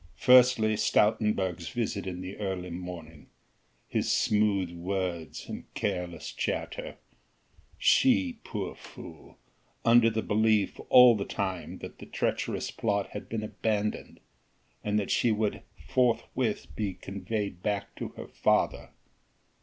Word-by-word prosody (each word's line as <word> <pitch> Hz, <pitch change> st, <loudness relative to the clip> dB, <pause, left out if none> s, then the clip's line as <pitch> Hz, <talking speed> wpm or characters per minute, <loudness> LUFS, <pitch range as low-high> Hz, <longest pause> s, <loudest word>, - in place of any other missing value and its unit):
Firstly 125 Hz, -3 st, +6 dB
Stoutenburg's 105 Hz, -5 st, +1 dB
visit 110 Hz, -5 st, -3 dB
in 90 Hz, -1 st, -4 dB
the 95 Hz, +1 st, -6 dB
early 95 Hz, -3 st, -3 dB
morning, 85 Hz, -3 st, -8 dB, 0.6 s
his -, -, 0 dB
smooth 100 Hz, -4 st, +2 dB
words 85 Hz, -2 st, -4 dB
and -, -, -8 dB
careless 90 Hz, -4 st, -3 dB
chatter! -, -, -3 dB, 0.8 s
she, 260 Hz, -2 st, +3 dB
poor 100 Hz, -3 st, -4 dB
fool! -, -, -13 dB, 0.5 s
under 115 Hz, 0 st, +6 dB
the 110 Hz, 0 st, -2 dB
belief 110 Hz, -1 st, +2 dB
all 125 Hz, -2 st, +8 dB
the 100 Hz, -, -2 dB
time 95 Hz, -4 st, -4 dB
that -, -, -8 dB
the -, -, -10 dB
treacherous -, -, -2 dB
plot 100 Hz, -3 st, -1 dB
had 105 Hz, -, -7 dB
been 110 Hz, -1 st, -3 dB
abandoned, 105 Hz, 0 st, -2 dB, 0.6 s
and 105 Hz, 0 st, 0 dB
that 105 Hz, -, -1 dB
she 120 Hz, -, +3 dB
would 110 Hz, -1 st, -1 dB, 0.3 s
forthwith 120 Hz, -2 st, 0 dB
be 100 Hz, -4 st, -2 dB
conveyed 100 Hz, 0 st, -4 dB
back 100 Hz, 0 st, -2 dB
to -, -, -4 dB
her -, -, -6 dB
father. -, -, +1 dB
105 Hz, 120 wpm, -29 LUFS, 95-110 Hz, 0.8 s, all